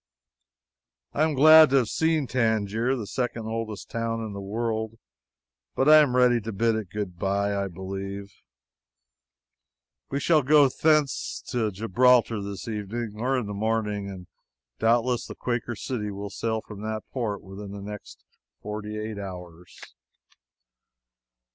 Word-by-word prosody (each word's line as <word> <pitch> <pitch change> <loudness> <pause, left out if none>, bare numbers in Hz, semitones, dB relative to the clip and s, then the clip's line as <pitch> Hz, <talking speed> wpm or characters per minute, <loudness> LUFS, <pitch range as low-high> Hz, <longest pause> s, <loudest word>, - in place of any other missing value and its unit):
I 145 - -1
am 155 -2 -1
glad 155 +2 +8
to 135 - +2
have 125 -4 +3
seen 160 -2 +1
Tangier 115 0 0
the 115 -5 -4
second 120 +1 -3
oldest 110 -2 -5
town 115 0 -2
in 105 - -6
the 100 - -6
world. 110 +2 -3 0.8
But 135 - +2
I 155 0 +9
am 145 -5 +4
ready 125 -2 +4
to 110 +2 -5
bid 115 +3 +1
it 110 -4 -3
good 95 -3 -5
bye, 100 +1 0
I 100 0 -1
believe. 95 +2 -6 1.8
We 140 - -1
shall 155 +1 +3
go 145 0 +5
hence 150 -3 +2
to 120 -4 0
Gibraltar 115 +2 +3
this 100 +1 -6
evening 110 +1 -4
or 130 +3 +1
in 125 - -2
the 105 - -5
morning, 105 -1 -1
and 95 -2 -9 0.5
doubtless 120 +2 +2
the - - -8
__Quaker 120 -1 -3
City__ 110 -5 -3
will 100 0 -6
sail 110 +1 -2
from 105 -2 -10
that 110 0 -4
port 110 -6 -2
within 100 +1 -9
the 100 - -7
next 105 0 -9 0.4
forty 105 0 -5
eight 105 -1 -5
hours. 90 -3 -9
110 Hz, 150 wpm, -26 LUFS, 100-125 Hz, 1.8 s, I